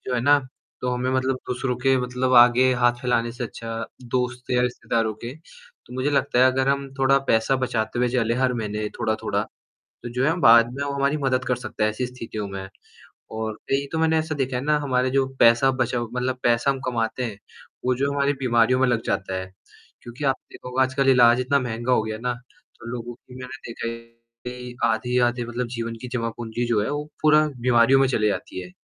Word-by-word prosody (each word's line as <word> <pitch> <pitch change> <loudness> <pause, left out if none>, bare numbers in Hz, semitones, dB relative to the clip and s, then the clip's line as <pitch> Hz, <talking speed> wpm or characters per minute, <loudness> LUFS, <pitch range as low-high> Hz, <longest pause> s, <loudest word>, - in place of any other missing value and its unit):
जो 125 - -1
है 120 - +1
ना, 145 +4 +5 0.4
तो 125 - -2
हमें 125 +1 -1
मतलब 130 0 0
दूसरों 125 0 -2
के 130 +2 +2
मतलब 125 +1 -1
आगे 125 +1 +6
हाथ 120 0 +3
फैलाने 120 -2 0
से 125 +1 -5
अच्छा, 115 0 -6 0.2
दोस्त 125 0 -3
या 125 0 +3
रिश्तेदारों 115 -2 -1
के, 120 +4 -8
तो 160 -5 -19
मुझे 130 +3 0
लगता 140 -2 +1
है 130 +1 +6
अगर 130 +1 0
हम 140 0 0
थोड़ा 135 +1 +4
पैसा 110 +4 +3
बचाते 120 -3 -2
हुए 125 0 +2
चले 115 -2 0
हर 130 0 +1
महीने 105 -2 -3
थोड़ा-थोड़ा, 110 0 -1
तो - - -16 0.4
जो 125 +2 -1
है 165 - +2
बाद 115 -1 +6
में 140 - -3
वो 140 - -3
हमारी 140 +1 +1
मदद 130 -1 +1
कर 125 0 0
सकता 120 -3 -3
है 110 - +2
ऐसी 125 +4 -3
स्थितियों 115 -4 -6
में। 95 -1 -6 0.7
और 110 -1 -3 0.2
कई 140 +1 +1
तो 160 - -1
मैंने 160 0 +3
ऐसा 160 0 -2
देखा 135 -3 -2
है 125 - -2
ना 150 0 +2
हमारे 130 -3 0
जो 135 0 +2
पैसा 115 +3 +6
बचा 120 - 0
मतलब 125 +2 -3
पैसा 120 +3 +3
हम 135 -1 -3
कमाते 120 +1 -1
हैं, 110 -4 -5 0.5
वो 125 0 +2
जो 140 +3 -1
हमारी 140 0 +1
बीमारियों 125 0 +3
में 130 - +4
लग 120 -2 +1
जाता 95 -1 -2
है। 95 0 -9 0.5
क्योंकि 120 +4 -8
आप 135 -1 +2 0.2
देखोगे 125 +1 -2
आजकल 130 +1 +1
इलाज 120 -1 +6
इतना 130 +3 +2
महंगा 120 0 -2
हो 125 - +3
गया 110 0 -4
ना, 125 +1 -2 0.5
तो - - -11
लोगों 120 0 -6
की 125 - -17
मैंने 130 +1 -8
देखा 115 - -4
है 115 0 -5 0.5
कि 125 0 -7
आधे-आधे 120 +1 +1
मतलब 120 +1 -3
जीवन 115 0 -4
की 125 - -6
जमा 115 -2 -1
पूंजी 120 +1 -3
जो 115 -3 +1
है 105 - -2
वो 145 0 -3 0.2
पूरा 155 0 +5
बीमारियों 120 +2 +4
में 135 - +4
चली 105 -4 +1
जाती 100 - -4
है, 90 - -10
125 Hz, 215 wpm, -23 LUFS, 115-130 Hz, 0.7 s, आगे